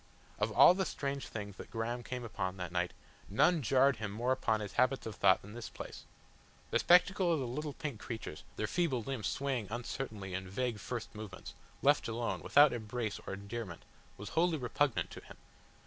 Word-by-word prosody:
Of - - +1
all - - +9
the 190 +1 0
strange 140 -5 -3
things 100 -3 -6
that - - -9
Graham 120 +2 -2
came 125 +1 -5
upon 95 -4 -3
that 90 -2 -4
night, 90 0 0 0.4
none 160 - +4
jarred 135 0 +4
more 110 +4 -1
upon 110 -4 +1
his 105 -2 -5
habits 130 +2 +2
of 110 - -4
thought 95 -1 +4
than 105 +2 -10
this 120 -1 -6
place. - - -9 0.7
The - - +3
spectacle 180 0 +5
of 165 - +3
the 130 - -1
little 145 +5 -3
pink 145 -9 -5
creatures, 110 -11 -6
their 110 - -1
feeble 135 -2 0
limbs 130 -4 -3
swaying 135 -6 -1
uncertainly 110 -4 -4
in 95 0 -4
vague 115 +2 -1
first 115 +3 -5
movements, 105 -4 -8 0.3
left - - +4
alone, 115 +1 -2
without 145 +1 +6
embrace 110 -2 -3
or - - -3
endearment, 100 -2 -6 0.3
was 100 0 -7
wholly 165 - +2
repugnant 130 0 0
to - - -8
him. - - -13
120 Hz, 185 wpm, -34 LUFS, 105-135 Hz, 0.7 s, all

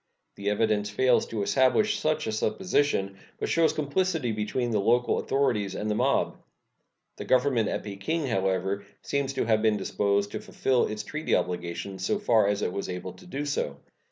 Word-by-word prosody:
The 100 0 -3
evidence 105 0 +1
fails 125 +4 +3
to 110 -3 -2
establish 130 - +3
such 155 0 0
a 110 - -1
supposition, 110 - 0 0.2
but - - -2
shows 165 -1 +3
a - - -11
complicity 155 -2 0
between 110 +3 -2
the 105 - +2
local 120 +4 +2
authorities 105 -8 0
and 105 0 -2
the - - +2
mob. - - +1 0.8
The - - -6
Government 125 -3 +2
at - - -3
Peking, 105 +11 -2
however, 95 -3 0 0.2
seems 140 -1 -1
to 135 - -1
have 110 -1 +2
been 110 -1 +3
disposed 100 +1 0
to - - -4
fulfill 130 -2 +1
its 105 0 -4
treaty 155 +7 -1
obligations 90 +2 -3
so 210 - +1
far 115 - +3
as 105 0 0
it 90 - -1
was 100 - -4
able 90 0 -5
to 90 - -16
do 140 +10 -4
so. 75 - -2
110 Hz, 185 wpm, -27 LUFS, 100-135 Hz, 0.8 s, fails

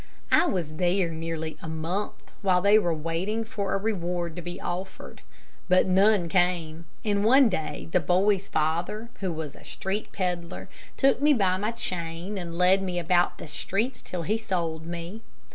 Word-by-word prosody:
I 335 +3 +5
was 160 -5 -2
there 180 0 +2
nearly 160 -1 -4
a 160 - -6
month, 165 +6 -2 0.3
while 185 -3 +3
they 200 +3 +6
were 175 -5 0
waiting 165 +8 -2
for 215 -4 -2
a - - +2
reward 175 -5 -2
to 175 - -5
be 175 +1 -6
offered. 185 +2 -6 0.5
But 185 0 +5
none 190 0 +4
came; 170 -2 +1 0.2
and 205 -1 +1
one 260 +3 +6
day, 150 - -3
the - - +4
boy's 195 +2 +2
father, 170 +9 -1
who 190 -3 -1
was 155 -3 -5
a - - -15
street 195 +3 -3
peddler, 180 -2 -3 0.3
took 270 -1 +3
me 295 +1 +6
by 190 -5 +2
my 210 +3 -1
chain 180 -2 -3
and 170 -2 -6
led 185 +2 +5
me 185 -2 -2
about 175 +1 +2
the - - -8
streets 200 - -2
till 180 -2 -5
he 215 +7 0
sold 165 -6 -2
me. 175 +5 -6
180 Hz, 175 wpm, -27 LUFS, 165-200 Hz, 0.5 s, they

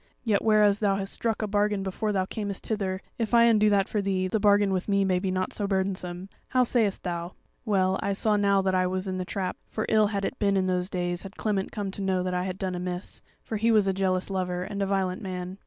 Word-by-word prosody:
Yet 215 -4 +1
whereas 210 -2 +4
thou 200 -2 +2
has 195 0 -3
struck 225 -2 -1
a - - -1
bargain 205 -1 +1
before 200 +3 -2
thou 190 -2 +1
camest 200 -1 -5
hither, 195 -3 -2 0.2
if 230 +1 +1
I 235 - +7
undo 215 -2 +5
that 200 -2 +3
for 210 - -1
thee, 190 -1 0
the 215 +4 0
bargain 205 -1 +4
with 185 -1 -2
me 200 -1 +3
may 185 -1 +2
be 190 +1 -2
nought 185 0 -1
so 205 - -2
burdensome. 190 -2 -2 0.2
How 255 -1 +3
sayest 225 -5 +1
thou?' 175 0 -4 0.3
"Well, 190 -3 +2
I 200 - 0
saw 210 +2 +1
now 200 -1 +3
that 190 0 +1
I 185 0 +2
was 185 +1 -2
in 185 0 -2
the 185 - -3
trap, 185 0 -3
for 220 - -3
ill 215 -1 +4
had 200 -1 -2
it 260 - -4
been 200 -1 +2
in 190 - +1
those 180 0 0
days 175 -2 -2
had 195 0 -10
Clement 200 -3 -1
come 200 -2 -3
to 200 - -6
know 190 -2 0
that 180 0 -2
I 180 0 -1
had 185 -1 -4
done 190 -1 -2
amiss; 180 +1 -5 0.2
for 220 - -3
he 225 +2 +2
was 210 -3 +4
a 195 - +2
jealous 190 0 0
lover, 180 -1 -2
and 200 +1 -5
a 195 - +1
violent 190 -1 -1
man." 185 -1 -5
195 Hz, 255 wpm, -27 LUFS, 185-205 Hz, 0.3 s, I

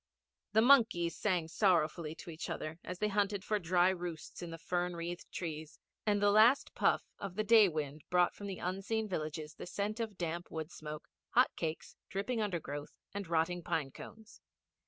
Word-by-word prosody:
The 220 +1 +5
monkeys 225 -10 +5
sang 180 -6 0
sorrowfully 165 -3 +2
to 170 - -9
each 160 - -6
other 155 +2 -4
as 180 - -5
they 210 - +1
hunted 205 -1 0
for 210 -1 0
dry 180 0 +4
roosts 175 -4 -5
in 175 - -5
the 165 - -6
fern 175 +1 -1
wreathed 170 +1 -5
trees, 155 -2 -5 0.3
and 205 -1 +3
the 205 0 +4
last 230 +7 +5
puff - - +2 0.2
of 195 -3 -5
the 215 - +1
day 215 -2 +7
wind 150 -2 -4
brought 180 0 +4
from 205 - -7
the 190 -2 -4
unseen 195 +5 -2
villages 155 -4 -4
the - - -8
scent 205 +4 -2
of 220 -4 -3
damp 170 0 -3
wood 160 +1 -5
smoke, 150 -1 -7 0.3
hot - - +5
cakes, 160 -1 -4
dripping 220 +4 -1
undergrowth, 155 -8 -4 0.2
and 200 -2 -4
rotting 170 +2 +1
pine 150 -4 -1
cones. 220 +8 -12
180 Hz, 180 wpm, -34 LUFS, 160-205 Hz, 0.3 s, day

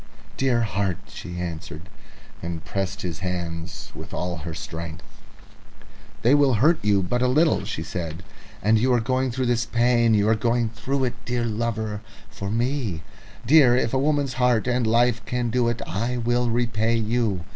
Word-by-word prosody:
"Dear 130 -3 +2
heart!" 95 -3 -1
she 90 0 -8
answered, 85 -1 -6 0.5
and 85 -1 -5
pressed 100 0 -3
his 90 -1 -4
hands 85 -3 -5
with - - -8
all 90 0 -2
her 80 +1 -6
strength. 80 +1 -7 1.2
"They 120 +4 +5
will 140 -4 +4
hurt 155 +9 +4
you 100 -2 +3
but 120 +7 -1
little," 145 +6 +3
she 80 - -4
said; 85 0 -5 0.4
"and 110 +2 +4
you 130 +3 +2
are 120 - +4
going 130 +3 0
through 130 +1 -1
this 120 -1 +1
pain 120 -1 +3
you 105 0 +3
are 110 - +5
going 115 +1 +1
through 135 +4 -2
it, 125 -2 0
dear 120 -1 -1
lover, 110 -2 -2 0.3
for 100 - -5
me... 115 - -1 0.4
Dear, 135 -2 +6
if 115 -1 0
a 130 - +2
woman's 145 -2 +1
heart 125 -3 +3
and 125 -2 +1
life 120 0 +3
can 125 -2 -1
do 125 0 +2
it, 120 - -3
I 120 +5 -2
will 120 +1 +1
repay 115 -1 +1
you. 110 -5 0
115 Hz, 170 wpm, -24 LUFS, 95-125 Hz, 1.2 s, Dear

